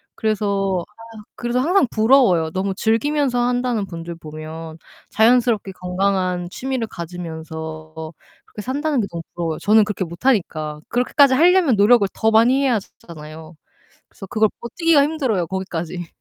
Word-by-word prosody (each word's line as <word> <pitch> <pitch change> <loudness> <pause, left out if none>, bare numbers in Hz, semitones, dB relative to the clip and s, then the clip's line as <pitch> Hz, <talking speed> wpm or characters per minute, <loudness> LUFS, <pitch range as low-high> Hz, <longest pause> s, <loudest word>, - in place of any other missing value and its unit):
그래서 200 -4 -1
아 225 +1 -14
그래서 240 +1 -1
항상 345 +3 +3
부러워요. 215 -8 +4
너무 190 +2 -2
즐기면서 245 +5 0
한다는 245 -3 0
분들 170 -1 -7
보면 160 0 -9 0.3
자연스럽게 225 -3 +3
건강한 180 -1 -1
취미를 255 0 -3
가지면서 160 -2 -7 0.5
그렇게 210 - -9
산다는게 275 -3 -1
너무 170 -1 -5
부러워요, 165 -2 -3
저는 215 +1 +4
그렇게 205 -2 -3
못하니까. 165 - -1
그렇게까지 260 +3 +3
하려면 340 - +4
노력을 205 0 +5
더 220 0 +1
많이 245 +5 +4
해야즈 235 -7 0 0.2
잖아요. 155 0 -10 0.6
그래서 195 - -11
그걸 215 +2 +2
버티기가 310 +4 +2
힘들어요, 260 - 0
거기까지. 175 -2 -4
205 Hz, 370 characters per minute, -20 LUFS, 170-245 Hz, 0.6 s, 노력을